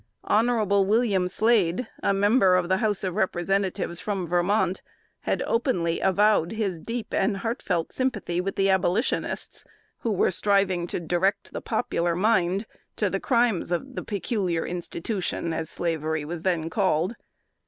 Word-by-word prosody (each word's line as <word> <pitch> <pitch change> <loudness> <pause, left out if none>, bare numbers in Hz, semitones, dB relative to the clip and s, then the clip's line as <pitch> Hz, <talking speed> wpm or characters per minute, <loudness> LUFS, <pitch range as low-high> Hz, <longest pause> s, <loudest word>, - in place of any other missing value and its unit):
Hon. 225 0 +2 0.2
William 205 -4 +2
Slade, 215 +1 +2
a - - +2
member 200 -1 +4
of 180 -1 +1
the 190 - +3
House 210 -2 0
of 185 -2 -1
Representatives 190 -2 -1
from 195 -4 -2
Vermont, 180 +2 +1 0.5
had - - +1
openly 180 -9 0
avowed 200 -1 +3
his 200 -6 -2
deep 230 +5 -5
and 195 +1 +1
heart 230 +5 -3
felt 170 -4 -2
sympathy 210 -9 -1
with 195 +1 -3
the 195 - +2
Abolitionists, 190 +4 0 0.4
who 230 - -1
were 195 - +2
striving 190 -2 +1
to - - -3
direct 185 +4 -1
the - - -4
popular 170 0 -1
mind 190 0 +2 0.3
to - - 0
the - - -1
crimes 235 - +1
of 260 +10 -2
the - - -4
"peculiar 195 -5 -2
institution," 175 0 -3
as 160 -1 -3
slavery 160 -2 -2
was 165 +1 -5
then 170 -3 0
called. 190 0 +1
190 Hz, 150 wpm, -25 LUFS, 175-215 Hz, 0.5 s, member